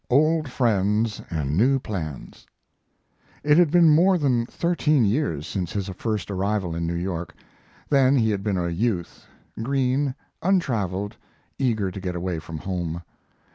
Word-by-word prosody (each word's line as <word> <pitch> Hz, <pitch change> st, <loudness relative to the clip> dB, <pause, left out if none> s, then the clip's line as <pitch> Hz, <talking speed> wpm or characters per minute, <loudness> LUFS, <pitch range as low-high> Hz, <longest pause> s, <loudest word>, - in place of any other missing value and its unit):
OLD 155 Hz, +3 st, +3 dB
FRIENDS 105 Hz, -3 st, +1 dB
AND 75 Hz, -3 st, -2 dB
NEW 130 Hz, +9 st, +4 dB
PLANS 85 Hz, -, -6 dB, 1.0 s
It 150 Hz, +3 st, +5 dB
had 175 Hz, -3 st, +5 dB
been 170 Hz, +1 st, +5 dB
more 175 Hz, +5 st, +5 dB
than 125 Hz, -7 st, +1 dB
thirteen 155 Hz, -7 st, +1 dB
years 100 Hz, -, 0 dB
since 90 Hz, -4 st, -3 dB
his 100 Hz, -1 st, -2 dB
first 105 Hz, -1 st, -3 dB
arrival 100 Hz, -2 st, -1 dB
in 85 Hz, 0 st, -2 dB
New 85 Hz, -, -2 dB
York. 85 Hz, -1 st, -4 dB, 0.5 s
Then 135 Hz, -1 st, +4 dB
he 110 Hz, -4 st, +3 dB
had 100 Hz, -2 st, -1 dB
been 100 Hz, -2 st, -1 dB
a 85 Hz, -1 st, -1 dB
youth, 90 Hz, 0 st, -2 dB, 0.3 s
green, 135 Hz, +2 st, 0 dB, 0.3 s
untraveled, 105 Hz, -, 0 dB, 0.4 s
eager 110 Hz, -8 st, 0 dB
to 95 Hz, -, -7 dB
get 90 Hz, -2 st, -3 dB
away 90 Hz, -1 st, -2 dB
from 80 Hz, 0 st, -7 dB
home. 85 Hz, -1 st, -4 dB
105 Hz, 145 wpm, -24 LUFS, 90-135 Hz, 1.0 s, It